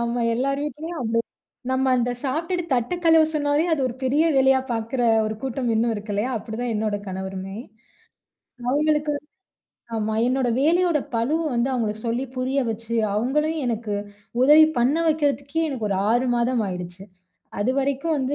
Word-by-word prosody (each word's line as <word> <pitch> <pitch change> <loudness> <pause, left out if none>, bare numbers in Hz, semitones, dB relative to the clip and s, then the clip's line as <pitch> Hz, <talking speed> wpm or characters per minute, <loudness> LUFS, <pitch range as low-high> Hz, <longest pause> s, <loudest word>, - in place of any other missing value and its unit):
ஆமா, 235 +1 -1
எல்லார் 275 +3 0
வீட்லயும் 315 +4 -5
அப்டி 230 0 +1 0.5
நம்ம 260 +1 +1
அந்த 245 0 +1
சாப்டுட்டு 330 +6 -1
தட்டு 245 +6 +1
கழுவ 325 -1 +6
சொன்னாலே 290 0 +2
அது 315 - +1
ஒரு 245 - -4
பெரிய 280 +5 +2
வேலையா 265 0 +5
பாக்குற 230 +2 -2 0.2
ஒரு 215 - -3
கூட்டம் 255 -2 -2
இன்னும் 230 +1 +2
இருக்கு 210 0 -5
இல்லையா? 210 +5 -1
அப்டிதான் 230 +2 -4
என்னோட 210 -1 0
கணவருமே. 190 +1 -5 1.1
அவுங்களுக்கு 300 +2 +2 0.8
ஆமா 215 0 -1
என்னோட 255 0 +1
வேலையோட 340 +2 +3 0.2
பழுவ 235 +8 +1 0.2
வந்து 235 +2 +1
அவுங்களுக்கு 220 -4 -2
சொல்லி 240 +3 -1
புரிய 260 +2 -1
வச்சு, 230 +1 -5 0.2
அவுங்களையும் 300 +7 0
எனக்கு 225 -3 -2 0.5
உதவி 300 +3 +8
பண்ண 250 +6 +3
வைக்கிறதுக்கே 290 0 0
எனக்கு 245 -7 -3
ஒரு 195 - +1
6 245 +3 +2
மாதம் 240 0 +1
ஆயிடுச்சு. 180 0 -6 0.6
அதுவரைக்கும் 275 +6 0
வந்து 265 +2 -1
255 Hz, 145 wpm, -23 LUFS, 225-290 Hz, 1.1 s, உதவி